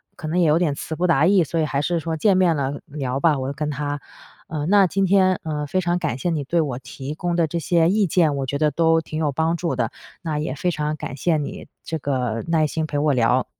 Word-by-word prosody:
可 155 - -7
能 170 +3 0
也 170 - +4
有 150 +1 +4
点 170 -4 +1
词 160 +3 -5
不 175 - 0
达 160 -4 +4
意， 190 -2 +5
所 165 +2 -2
以 155 - +2
还 140 -1 -1
是 175 +2 0
说 160 0 -3
见 195 +4 +3
面 180 -3 +3
了 140 0 -2
聊 135 -2 -3
吧， 150 0 +3
我 130 - -3
就 - - -4
跟 150 +1 -3
她。 145 0 -3 0.5
呃， 150 -2 -3
那 200 +1 +5
今 195 +2 +1
天， 185 -1 +3
呃， 150 -2 -3
非 185 - 0
常 175 0 0
感 125 - -2
谢 175 - -2
你 155 -3 -1
对 170 +5 +1
我 135 -6 -2
提 135 +1 -7
供 175 +1 -2
的 170 -1 +3
这 170 +3 -3
些 165 +1 +2
意 205 +2 +3
见， 160 -3 +2
我 135 -1 -2
觉 140 - -2
得 155 0 +3
都 165 0 +3
挺 155 -1 -7
有 150 -2 +1
帮 160 +4 0
助 170 -5 -2
的， 120 -3 -1 0.3
那 155 -3 -2
也 150 -3 -2
非 180 +5 -1
常 150 -1 -2
感 145 - -6
谢 160 +4 +1
你 145 - -5 0.2
这 160 - -3
个 125 -5 -2
耐 165 -2 +2
心 160 +2 -2
陪 145 - -3
我 150 0 +2
聊。 125 +1 +2
155 Hz, 285 characters per minute, -22 LUFS, 140-170 Hz, 0.5 s, 意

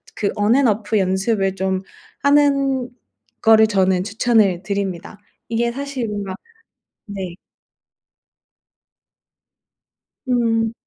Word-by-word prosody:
그 205 - -1
on 210 +3 +3
and 275 -4 +4
off 210 +1 -1
연습을 195 +1 0
좀 190 -1 -1 0.4
하는 275 -3 +2 0.5
거를 220 -1 +6
저는 190 -3 +1
추천을 210 -4 +2
드립니다. 195 0 -4 0.3
이게 235 +1 0
사실 275 -3 -4
뭔가 200 -2 -4 0.7
네. 190 -4 -6 2.9
음. 225 -2 +1
215 Hz, 190 characters per minute, -20 LUFS, 195-235 Hz, 2.9 s, 거를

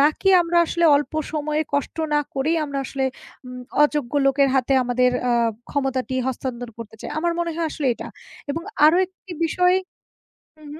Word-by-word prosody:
নাকি 305 +7 +3
আমরা 340 +1 -1
আসলে 340 +1 0
অল্প 290 +2 -2 0.2
সময়ে 305 0 -1
কষ্ট 285 +2 -1 0.2
না 295 - +4
করেই 305 +5 +1
আমরা 280 -1 -4
আসলে 270 0 -2 0.4
উম 250 0 -8 0.2
অযোগ্য 295 -4 +1
লোকের 275 0 +3
হাতে 265 0 +2
আমাদের 250 +1 +2 0.2
আ - - +3 0.4
ক্ষমতাটি 265 -2 -1
হস্তান্তর 245 -2 -4
করতে 220 -1 -9
চাই। - - -7
আমার 340 +2 0
মনে 340 - -1
হয় 335 - 0
আসলে 290 - -3
এটা - - -8 0.4
এবং 330 +4 -3 0.2
আরো 315 +3 +5
একটি 375 0 -13
বিষয় 360 +3 +3 0.8
হু, 310 - -18
হু - - -11
285 Hz, 170 wpm, -22 LUFS, 260-325 Hz, 0.8 s, আরো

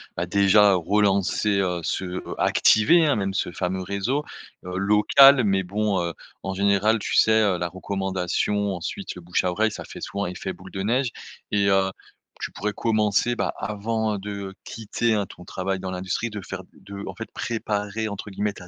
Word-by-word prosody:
bah, 85 - -1
déjà 100 +2 +5
relancer, 100 +2 +1
heu, 90 -3 0
se 90 +1 -3 0.2
activer, 160 +10 +5
hein, 145 -7 +2
même 95 -1 -1
ce 95 - -1
fameux 95 +1 -2
réseau, 100 +10 -1 0.4
heu, 90 0 -4
local, 110 +7 +6
mais 95 -2 +2
bon, 100 +1 0
heu, 85 -1 -2 0.3
en 95 - -3
général, 100 +3 +3
tu - - -4
sais, 110 0 +5
heu, 100 -4 +2
la 85 0 -2
recommandation 95 +2 -1
ensuite 90 - -5
le 90 - -9
bouche 85 +1 -1
à 90 - +1
oreille, 110 +4 +1
ça - - -7
fait - - -10
souvent 100 0 -3
effet 90 +1 -5
boule 95 0 -13
de 95 - -4
neige 120 +6 +1 0.4
et 100 -1 +2
heu, 95 0 +3 0.5
tu - - -4
pourrais 105 +2 -2
commencer, 110 +1 +1
bah, - - -1
avant, 110 +1 -2
heu, - - -3
de 100 -1 -6
quitter, 115 +1 -1
hein, 105 -2 0
ton 90 - -13
travail 95 +2 -3
dans 95 0 -5
l'industrie. 95 +5 -2
De 105 - -5
faire 95 0 -7
de 100 0 -9
en - - -6
fait 115 - -7
«préparer» 110 -2 -2
entre 105 0 -6
guillemets 105 +1 -1
ta 90 -3 -12
100 Hz, 190 wpm, -24 LUFS, 95-105 Hz, 0.5 s, local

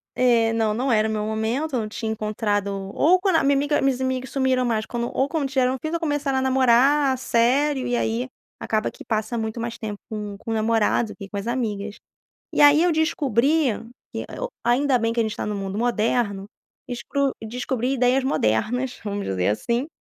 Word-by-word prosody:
É 235 -3 +3
não, 220 -2 +1
não 255 +3 0
era 215 0 +3
o - - -2
meu 215 -1 -1
momento 225 +8 -2
eu 240 - +1
não 215 - -4
tinha 220 0 -4
encontrado, 210 -1 -1 0.3
ou 355 +4 +4
quando 375 -3 +1
a - - +2
minha 280 0 +3
amiga, 290 +2 +1
meus 270 -1 +1
amigos 260 -1 -2
sumiram 260 -2 +1
mais 220 -2 0
quando, 240 0 -3
ou 270 +2 +1
quando 305 -3 -1
tiveram 260 -1 +1
um - - -5
filho, 315 +5 -5
ou 335 - 0
começaram 290 -4 0
a - - -1
namorar 265 +1 +4
sério, 260 +3 +2
e 245 - 0
aí 240 +3 -1 0.3
acaba 215 -1 -1
que - - -13
passa 220 +1 -1
muito 220 +1 -3
mais 235 0 -4
tempo 210 -2 -6
com 210 -2 -5
com 225 - -6
o - - +1
namorado 220 +1 +1
do - - -9
que 200 -2 -9
com 200 - -5
as 200 +3 -4
amigas, 215 -4 -3 0.5
e - - 0
aí 290 +2 +7
eu 350 -1 +3
descobri 300 -3 +2 0.4
que - - -4
eu - - -5 0.2
ainda 255 +2 +3
bem 230 0 0
que 230 - 0
a - - +4
gente 220 -1 -2
está - - -4
no 210 - -2
mundo 195 0 -4
moderno, 225 -3 0 0.4
desco 270 +3 -1
descobri 250 +2 -2
ideias 255 +1 +2
modernas, 245 - 0
vamos 205 -1 -3
dizer 90 -1 0
assim, 235 - 0
240 Hz, 210 wpm, -23 LUFS, 220-270 Hz, 0.5 s, aí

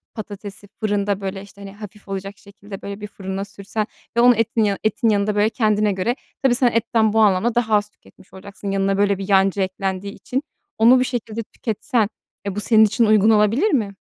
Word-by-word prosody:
patatesi 205 -1 -8
fırında, 205 -2 -1
böyle, 195 0 -4
işte, 200 0 -15
hani, 195 0 -8
hafif 210 0 -12
olacak 195 0 -5
şekilde, 200 0 -12
böyle, 200 +1 -7
bir 210 - -5
fırına 195 -1 -5
sürsen 205 +2 -4 0.3
ve - - +5
onu 245 0 +6
etin 225 0 +1
yanı 200 -2 +1
etin 220 +2 +1
yanında, 205 0 +1
böyle, 210 +1 +3
kendine 215 -3 +1
göre 195 +6 -1 0.3
tabii 260 -2 +4
sen 245 -2 +3
etten 225 -1 +1
bu 225 - +3
anlamda 215 +3 +3
daha 225 -3 +2
az 210 0 +1
tüketmiş 200 - -22
olacaksın 200 +1 -7
yanına 195 0 +1
böyle 200 -1 +2
bir 195 +1 -6
yancı 195 0 +3
eklendiği 190 +1 -3
için. 265 +3 -4 0.3
Onu 235 +3 +6
bu - - +3
şekilde 230 -3 -4
tüketsen 225 +1 -2 0.4
e, 200 -2 -3
bu - - -2
senin 220 +1 +5
için 225 +2 +2
uygun 215 0 +4
olabilir 220 - +3
mi? 215 - 0
205 Hz, 200 wpm, -21 LUFS, 200-225 Hz, 0.4 s, onu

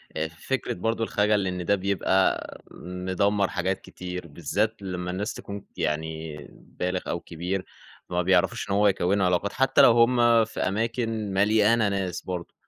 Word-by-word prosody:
آآ 80 - -1
فكرة 85 +11 -3
برضو 115 +5 -1
الخجل 105 -2 +1
إن 90 -1 -3
ده 100 - +3
بيبقى 95 -1 0
مدمَّر 95 +2 -1
حاجات 95 0 -2
كتير، 90 -1 -7
بالذات 100 +9 -2
لمَّا 90 -2 -4
الناس 100 +4 -3
تكون 100 0 -8
يعني 80 0 -3 0.4
بالغ 90 0 -1
أو 85 - -1
كبير، 90 +4 -4 0.4
فما 90 0 0
بيعرفوش 95 +5 +1
إن 100 - +1
هو 105 +1 +4
يكونوا 95 0 +2
علاقات 90 +3 +1
حتى 135 +2 +4
لو 130 -4 +8
هم 115 -1 +4
في 110 - -8
أماكن 110 0 -1
مليانة 105 +2 +3
ناس 95 -3 -2
برضو، 90 -2 -6
95 Hz, 150 wpm, -26 LUFS, 90-105 Hz, 0.4 s, لو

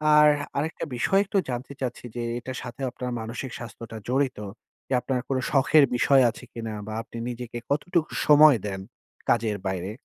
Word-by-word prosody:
আর 150 0 +8 0.3
আরেকটা 155 +3 -2
বিষয় 195 +11 +3
একটু 200 0 -1
জানতে 125 +3 -4
চাচ্ছি 125 -1 -4
যে 120 - -2 0.2
এটার 130 +1 -6
সাথে 120 +1 -8
আপনার 125 0 -5
মানসিক 115 +3 -5
স্বাস্থ্যটা 115 0 -8
জড়িত। 130 -2 +1 0.5
যে - - -1
আপনার 125 +1 -1
কোনো 130 -1 +1
শখের 145 +1 +5
বিষয় 135 +2 +5
আছে 115 - -9
কিনা 115 -2 -5
বা 110 - -5
আপনি 115 - -10
নিজেকে 120 -1 -6
কতটুকু 160 +3 0 0.2
সময় 150 -2 +8
দেন 95 -1 -4 0.5
কাজের 110 -3 +2
বাইরে? 95 +1 -2
125 Hz, 165 wpm, -26 LUFS, 115-140 Hz, 0.5 s, আর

